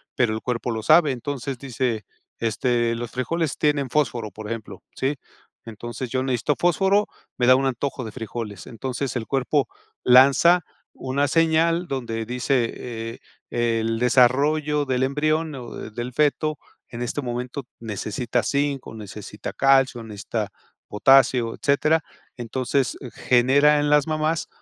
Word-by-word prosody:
pero 120 -3 +2
el 110 - -3
cuerpo 125 -1 -2
lo 110 -1 -3
sabe. 155 +4 +5
Entonces 135 +1 -4
dice, 120 -4 -2 0.3
este, 115 +1 0
"los 120 0 -5
frijoles 155 +4 -2
tienen 145 -3 +1
fósforo, 120 -6 0
por 110 -1 -9
ejemplo", 115 -2 -6
¿sí? 135 +3 -1 0.5
"Entonces 120 +2 -6
yo 130 +1 -1
necesito 130 +3 0
fósforo, 195 +4 +2 0.3
me 125 - +2
da 130 - +8
un 135 +1 +1
antojo 135 +1 -2
de 110 - -6
frijoles". 115 -4 -6
Entonces 130 +3 -4
el 120 -3 -2
cuerpo 135 +1 +1 0.4
lanza 140 +8 +6 0.3
una 140 +2 -1
señal 165 +2 +2
donde 115 -4 -3
dice, 125 +1 0
eh, 115 -1 -6 0.3
el 115 -1 0
desarrollo 140 +4 +3
del 130 -1 0
embrión, 155 +3 0
o, 125 -3 -8 0.2
del 120 +3 -5
feto 150 +2 +1 0.3
en 115 - -7
este 120 +4 -3
momento 125 +2 -4 0.2
necesita 115 +2 -2
zinc, 140 -1 -1
o, - - -9
necesita 105 0 -8
calcio, 135 -3 +3
o, - - -9
necesita 105 0 -4 0.4
potasio, 125 0 +4
etcétera. 150 +3 +2 0.4
Entonces 130 +3 -1 0.2
genera 140 +4 +4
en 145 0 +1
las 150 0 +4
mamás 155 +1 -1
130 Hz, 140 wpm, -23 LUFS, 115-145 Hz, 0.5 s, da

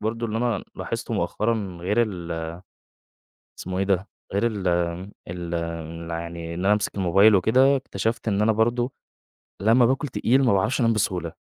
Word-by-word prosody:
برضه 115 +2 -2
اللي 110 0 -2
أنا 120 -1 -1
لاحظته - - -4
مؤخرًا 105 -5 -1
غير 105 +6 +2
ال 85 -6 -4 1.1
اسمه 90 0 -4
إيه - - +2
ده؟ 95 0 +1 0.3
غير 100 +4 +2
ال 105 -5 -3
ال 85 +2 -1 0.4
ال 85 0 -4
يعني 85 0 -5
إن 90 +3 -3
أنا 100 - +5
أمسك 105 -1 -1
الموبايل 100 +3 +5
وكده، 130 +9 +4
اكتشفت 115 -3 -3
إن 100 -1 +1
أنا 110 +1 +4
برضه، 120 +3 +1 0.7
لمّا 115 +4 +5
باكل 135 +4 +1
تقيل 130 +1 +2
ما 120 - +4
باعرفش 105 +8 +1
أنام 115 -2 +3
بسهولة، 90 -6 -1
100 Hz, 160 wpm, -24 LUFS, 85-115 Hz, 1.1 s, أنا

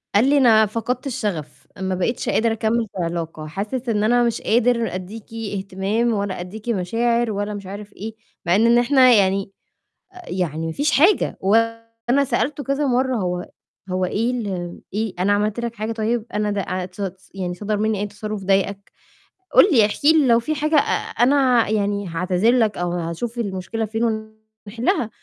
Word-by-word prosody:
قال 245 +7 +5
لي: 290 - +4
"أنا 225 -5 +6
فقدت 230 +5 -3
الشغف، 205 - -4
ما 190 0 -1
بقيتش 230 +7 -1
قادر 230 0 +2
أكمّل 225 +1 0
في 180 - -1
علاقة، 165 -2 -4
حاسس 210 +9 -4
إن 210 -2 +1
أنا 240 +2 +3
مش 235 -1 0
قادر 235 -2 +1
ادّيكِ 205 +5 -8 0.2
اهتمام 195 +5 -1
ولا 200 -3 -2
ادّيكِ 210 +6 -7
مشاعر 230 +4 +1
ولا 205 0 -3
مش 200 -1 -7
عارف 205 +2 -8
إيه." 220 +2 -7 0.3
مع 175 +1 +3
إن 230 +3 +5
إحنا 255 +1 +5
يعني 195 -2 +2 0.8
يعني 165 -3 -2
مفيش 285 - 0
حاجة، 355 +8 +3
وأنا 230 +5 +1
سألته 270 +3 -1
كذا 275 +1 0
مَرّة 260 0 +1
هو 180 -3 -3 0.4
هو 185 0 0
إيه 225 +6 0
ال 190 -8 -4
إيه، 215 -1 -2
أنا 195 +3 +3
عملت 210 +2 0
لك 235 -1 -4
حاجة 215 +1 -3
طيب؟ 225 0 -1
أنا 210 0 0
ده 205 -1 -1
عت 185 0 -4
ص 190 -1 -6
يعني 180 -2 -3
صدر 210 +2 -2
مني 215 -1 0
أي 205 - -1
تصرُّف 210 0 -6
ضايقك؟ 195 +1 0 0.6
قُل - - +9
لي 230 -8 +6
احكي 285 +9 +3
لي 305 -4 +4
لو 235 -1 +5
في 305 +7 -2
حاجة 305 +2 0
أ - - +8 0.4
أنا 255 -3 +4
يعني 205 -2 0
هاعتذر 180 +6 +1
لك، 225 -4 +2
أو 175 0 -1
هاشوف 175 +8 -4
المشكلة 210 +1 -3
فين 220 +2 -3 0.6
ونحلها، 230 +1 -1
215 Hz, 175 wpm, -21 LUFS, 190-235 Hz, 0.8 s, قُل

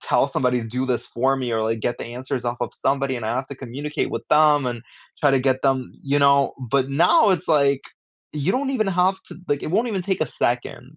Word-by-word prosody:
tell 140 - +1
somebody 125 -2 0
to 115 - -6
do 125 +3 -2
this 120 -2 -2
for 130 +3 +1
me, 130 -2 -3
or, 110 -1 0
like, 115 0 -1
get 120 +2 -2
the - - -5
answers 130 0 -4
off 120 0 -2
of 120 - -2
somebody, 135 -1 0
and 120 - -6
I 110 - -1
have 130 +2 -3
to 140 - -7
communicate 140 +4 -4
with 115 - -3
them, 150 -2 +4
and 120 -2 -4 0.4
try 145 -2 +4
to 135 - +3
get 130 0 +1
them" 135 -2 0
you 145 +1 +1
know, 140 0 +4 0.2
but 135 0 +2
now, 175 - +4
it's 180 -2 -1
like, 140 -3 +3 0.5
you 150 +5 -1
don't 270 +1 -1
even 235 -6 0
have 185 0 +2
to 175 - -10
like, 145 0 0
it - - -4
won't 225 +5 +2
even 200 -4 -2
take 190 -3 -1
a - - -1
second, 125 +4 -3
135 Hz, 245 wpm, -22 LUFS, 125-155 Hz, 0.5 s, them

